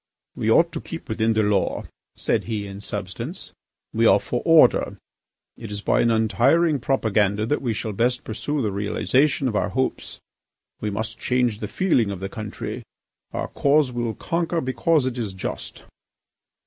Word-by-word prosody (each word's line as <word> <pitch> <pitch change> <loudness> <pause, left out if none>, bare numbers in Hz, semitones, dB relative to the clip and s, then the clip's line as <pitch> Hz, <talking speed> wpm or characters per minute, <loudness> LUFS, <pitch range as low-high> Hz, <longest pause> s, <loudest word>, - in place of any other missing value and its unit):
"We - - -1
ought - - +5
to - - -4
keep - - -8
within 110 +1 +1
the 110 0 +2
law," 105 -2 +1 0.3
said - - 0
he 110 -2 -3
in 100 0 -8
substance. 105 - -5 0.4
"We - - +3
are - - +6
for - - -3
order. - - +5 0.6
It 115 - -8
is 105 0 -5
by - - +2
an 115 - +3
untiring 135 +8 +3
propaganda 110 -5 +1
that 150 +6 0
we 125 -4 -1
shall 110 0 -4
best 125 +4 0
pursue 130 +6 -2
the 105 - 0
realisation 130 +8 +1
of 115 - -2
our 105 - +1
hopes. 130 +6 -2 0.6
We 105 - -2
must 110 +2 -4
change 125 -4 +1
the 105 - -4
feeling 125 - +1
of 100 -2 -4
the 95 +1 -4
country. 105 -1 -6 0.5
Our - - -3
cause 140 -1 +2
will 120 -2 -2
conquer 170 0 -1
because 130 +3 +1
it 130 -1 -2
is 105 -5 -3
just." 95 - -6
115 Hz, 170 wpm, -23 LUFS, 105-130 Hz, 0.6 s, are